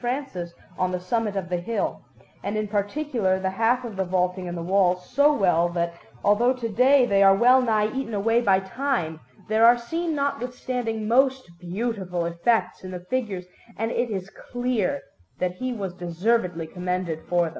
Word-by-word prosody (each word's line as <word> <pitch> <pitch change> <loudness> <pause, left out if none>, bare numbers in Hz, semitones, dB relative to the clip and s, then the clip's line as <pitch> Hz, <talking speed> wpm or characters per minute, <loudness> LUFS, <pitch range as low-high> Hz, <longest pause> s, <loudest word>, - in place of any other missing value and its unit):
Francis 245 -9 -3 0.3
on 185 0 +1
the 180 - -2
summit 210 +2 -1
of 190 -2 -2
the 180 0 -1
hill, 225 +6 -2 0.4
and 205 +2 -2
in 215 0 -1
particular 205 -1 0
the 190 0 -1
half 230 +5 +1
of 225 -4 -6
the 190 - +1
vaulting 180 0 -1
and 175 0 -4
the 170 - -4
walls, 180 0 +2
so 285 +4 +4
well 175 - +2
that, 170 -1 -1 0.3
although 230 +5 +4
to 250 -3 -4
day 255 +4 +5
they 200 -3 +2
are 195 0 +7
wellnigh 230 -2 +4
eaten 265 -5 -3
away 225 +4 +2
by 195 -5 +4
time, 190 - -2 0.3
there 220 +1 +2
are 240 +1 +8
seen 325 +7 -3
notwithstanding 250 -5 -2
most 265 +3 +3 0.2
beautiful 185 -2 -3
effects 180 +3 0
in 185 - -7
the 180 -1 -7
figures; 210 -8 -2 0.3
and 225 +1 -1
it 240 0 0
is 195 -2 -4
clear 245 - -2 0.3
that 180 0 -2
he 255 +3 -2
was 195 -6 -4
deservedly 180 0 -1
commended 180 -1 -3
for 175 0 +3
them. 165 - -1
205 Hz, 175 wpm, -25 LUFS, 180-245 Hz, 0.4 s, are